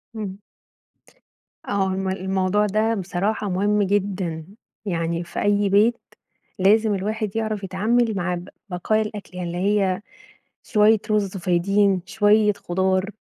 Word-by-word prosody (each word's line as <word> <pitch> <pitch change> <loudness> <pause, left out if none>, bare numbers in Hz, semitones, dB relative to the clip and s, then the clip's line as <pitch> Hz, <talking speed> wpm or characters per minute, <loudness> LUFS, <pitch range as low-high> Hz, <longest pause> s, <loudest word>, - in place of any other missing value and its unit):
امم، 200 -3 -5 1.3
آه 195 -1 +1
ما 190 0 -2
الموضوع 190 +2 0
ده 215 +3 +1
بصراحة 195 +2 -2
مهم 205 +3 +1
جدًا، 190 -5 -1 0.4
يعني 170 -1 -1
في - - -5
أي 205 0 +2
بيت 215 +4 +3 0.6
لازم 210 +3 +4
الواحد 215 +2 -3
يعرف 215 -2 -2
يتعامل 220 +5 +1
مع 180 0 -1
ب 175 +2 -7 0.2
بقايا 215 +4 0
الأكل 210 -4 -7
اللي 175 -1 -4
هي 195 0 +1 0.6
شوية 215 0 +4
رز 200 -2 0
فايضين، 190 +2 +2
شوية 210 +1 +3
خضار، 190 +1 -1
200 Hz, 120 wpm, -23 LUFS, 185-210 Hz, 1.3 s, لازم